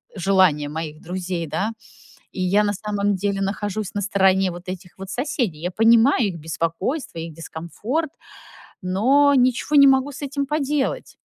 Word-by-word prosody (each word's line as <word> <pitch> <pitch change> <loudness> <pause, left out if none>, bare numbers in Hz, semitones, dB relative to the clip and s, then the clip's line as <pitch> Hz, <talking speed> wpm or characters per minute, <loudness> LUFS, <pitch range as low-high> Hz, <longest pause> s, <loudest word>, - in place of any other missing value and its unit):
желания 185 -6 +2
моих 155 0 -6
друзей, 180 -1 -4
да. 200 +9 -2 0.6
И 185 - -5
я 195 +3 +3
на 205 0 0
самом 205 0 -1
деле 195 +1 -2
нахожусь 205 0 -3
на 205 - -2
стороне 190 -1 +2
вот 175 +1 -10
этих 180 -1 -8
вот 195 0 -8
соседей. 240 - -2
Я 180 +2 -2
понимаю 230 +3 +4
их 180 -4 -5
беспокойство, 165 - -3
их 165 0 -6
дискомфорт, 205 - -4 0.7
но 260 +11 +3
ничего 255 +3 +2
не 280 -1 +8
могу 270 +1 +2
с 280 - -10
этим 280 0 -2
поделать. 295 - -2
200 Hz, 155 wpm, -22 LUFS, 180-255 Hz, 0.7 s, не